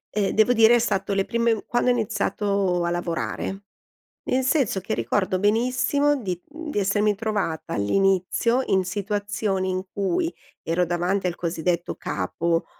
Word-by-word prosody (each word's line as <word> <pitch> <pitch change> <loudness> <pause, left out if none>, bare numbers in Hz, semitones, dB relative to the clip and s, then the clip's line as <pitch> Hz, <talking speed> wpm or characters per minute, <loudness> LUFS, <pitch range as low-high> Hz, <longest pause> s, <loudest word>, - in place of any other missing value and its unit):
ehm, 200 -2 +1
devo 220 +3 +5
dire, 225 +1 +6
è - - +4
stato 200 -4 0
le 195 0 +1
prime 230 -2 +1
quando 240 +1 +1
ho - - +5
iniziato 200 -5 0
a 170 - 0
lavorare, 175 +3 -3 0.6
nel 260 +1 +1
senso 260 -7 +1
che 185 - -3
ricordo 185 - 0
benissimo 250 +8 +2
di, 180 -4 -3
mhmm, 315 0 -7
di 210 - -2
essermi 205 +1 +2
trovata 205 -6 -2
all'inizio 195 - +2
in 190 -1 +2
situazioni 205 0 -2
in 185 0 -1
cui 330 - 0 0.3
ero 175 +2 0
davanti 180 +3 0
al 175 - -1
cosiddetto 170 0 -2
capo, 165 - -1
200 Hz, 150 wpm, -24 LUFS, 180-225 Hz, 0.6 s, dire